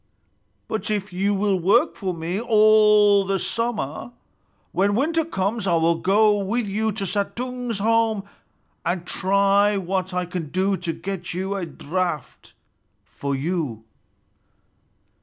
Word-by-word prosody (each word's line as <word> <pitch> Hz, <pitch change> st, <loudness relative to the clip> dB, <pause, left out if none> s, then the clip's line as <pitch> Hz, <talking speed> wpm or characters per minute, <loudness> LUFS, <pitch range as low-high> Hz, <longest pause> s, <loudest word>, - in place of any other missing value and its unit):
But 220 Hz, -1 st, -3 dB
if 205 Hz, -2 st, -2 dB
you 200 Hz, +3 st, +1 dB
will 195 Hz, -1 st, +1 dB
work 200 Hz, +8 st, +3 dB
for 190 Hz, -3 st, -3 dB
me 170 Hz, +3 st, -3 dB
all 210 Hz, -2 st, +5 dB
the 195 Hz, 0 st, 0 dB
summer, 230 Hz, -, -3 dB, 0.6 s
when 200 Hz, +2 st, +1 dB
winter 325 Hz, +7 st, +1 dB
comes 205 Hz, -, -2 dB
I 175 Hz, -, +3 dB
will 165 Hz, +1 st, +3 dB
go 205 Hz, +4 st, +3 dB
with 215 Hz, +4 st, -1 dB
you 215 Hz, +2 st, -1 dB
to 200 Hz, -1 st, -3 dB
Suttung's 235 Hz, +5 st, -3 dB
home 220 Hz, 0 st, +1 dB, 0.6 s
and 175 Hz, 0 st, -2 dB
try 200 Hz, +2 st, +2 dB
what 190 Hz, 0 st, -2 dB
I 180 Hz, 0 st, -1 dB
can 175 Hz, -3 st, -5 dB
do 190 Hz, +4 st, +1 dB
to 180 Hz, -2 st, -3 dB
get 190 Hz, -2 st, -5 dB
a 190 Hz, 0 st, -2 dB
draught 165 Hz, 0 st, -4 dB, 0.5 s
for 140 Hz, -1 st, -4 dB
you." 140 Hz, -6 st, -3 dB
195 Hz, 130 wpm, -23 LUFS, 180-215 Hz, 0.6 s, all